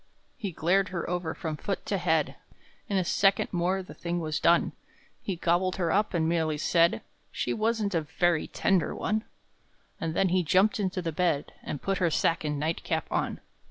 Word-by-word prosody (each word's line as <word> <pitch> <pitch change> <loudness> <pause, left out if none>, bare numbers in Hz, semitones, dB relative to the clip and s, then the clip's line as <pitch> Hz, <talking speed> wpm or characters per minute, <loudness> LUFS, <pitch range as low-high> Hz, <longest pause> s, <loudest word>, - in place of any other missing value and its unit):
He 205 -6 -4
glared 185 +4 +2
her 175 -2 -3
over 175 -2 -2
from 155 -2 -4
foot 195 +5 -3
to 200 - -1
head; 160 -4 +1 0.6
In 200 - +1
a 185 - +2
second 195 +2 +2
more 185 +2 0
the - - -11
thing 175 0 -3
was 155 -2 -2
done! 170 0 +4 0.5
He 195 - -3
gobbled 175 +2 +1
her 170 -3 0
up, 205 0 +1
and 160 -1 +2
merely 160 -2 +1
said, 170 +3 +3 0.3
"She - - -1
wasn't 220 -2 0
a 165 - +2
very 160 +2 +1
tender 190 -3 +1
one!" 215 +1 -1 0.7
And 165 0 -3
then 190 +1 +3
he 185 +1 +3
jumped 190 +6 +3
into 185 -2 -1
the 165 - -1
bed, 155 -3 0
And 145 - -6
put 195 0 0
her 175 -3 +3
sack 165 +1 +1
and 150 -1 -1
night 160 +3 -1
cap 160 -2 -1
on. - - -1
175 Hz, 195 wpm, -28 LUFS, 160-190 Hz, 0.7 s, done